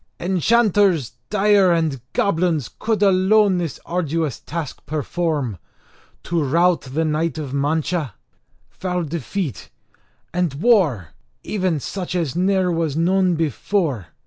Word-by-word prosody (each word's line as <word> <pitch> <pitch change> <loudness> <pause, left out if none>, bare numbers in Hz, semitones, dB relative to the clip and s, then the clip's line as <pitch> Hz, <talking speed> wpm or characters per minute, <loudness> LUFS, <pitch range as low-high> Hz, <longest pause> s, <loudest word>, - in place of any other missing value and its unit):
Enchanters 190 - +2 0.2
dire 205 -2 +4
and 160 -6 0
goblins 165 - 0
could 220 -2 0
alone 195 0 +4
this 165 -5 -4
arduous 165 -5 -2
task 165 -5 -6
perform; 150 - -2 0.6
to 170 -2 0
rout 170 +5 +3
the 145 +5 -2
knight 155 0 -1
of 145 -4 -5
Mancha, 150 - -1 0.6
foul 180 -1 -3
defeat, 165 - -4 0.6
and 175 -5 0
war, 155 - +2 0.3
even 185 -6 -1
such 180 +4 -5
as 165 -6 -1
ne'er 185 0 +2
was 165 -3 -1
known 185 +1 +2
before. 155 - -1
170 Hz, 115 wpm, -21 LUFS, 150-185 Hz, 0.6 s, dire